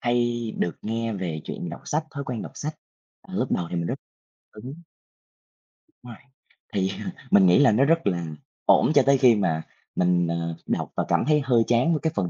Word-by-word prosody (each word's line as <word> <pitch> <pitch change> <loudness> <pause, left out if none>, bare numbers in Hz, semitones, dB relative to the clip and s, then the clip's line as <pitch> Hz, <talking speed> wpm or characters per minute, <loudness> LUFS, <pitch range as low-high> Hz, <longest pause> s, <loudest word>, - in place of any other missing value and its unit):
hay 120 0 +1 0.2
được 85 - -1
nghe 115 +1 -2
về 90 -6 -4
chuyện - - -5
đọc - - -7
sách, 155 +2 -1
thói 140 0 -6
quen 125 -4 -4
đọc - - -8
sách. 155 +1 -5 0.5
Ờ, - - -12
lúc - - -1
đầu 85 - 0
thì - - -3
mình 85 0 -1
rất - - -1 0.6
đúng. 130 +10 -9 1.2
Rồi. 120 -2 -10 0.6
Thì 95 -1 0 0.4
mình 100 -2 +6
nghĩ 90 -1 +5
là 145 -5 +6
nó 125 +6 +3
rất 165 +2 +2
là 85 -2 0 0.4
ổn - - +5
cho 140 - +8
tới 140 0 +5
khi 125 -3 +6
mà 80 -6 0 0.3
mình, 90 -1 +2
ờ, 85 0 -2
đọc - - -2
và - - 0
cảm 85 - +2
thấy 150 -1 +4
hơi 120 -4 +3
chán 120 +7 +3
với 155 - 0
cái 160 +2 -1
phần 95 -4 0
115 Hz, 205 wpm, -25 LUFS, 90-135 Hz, 1.2 s, cho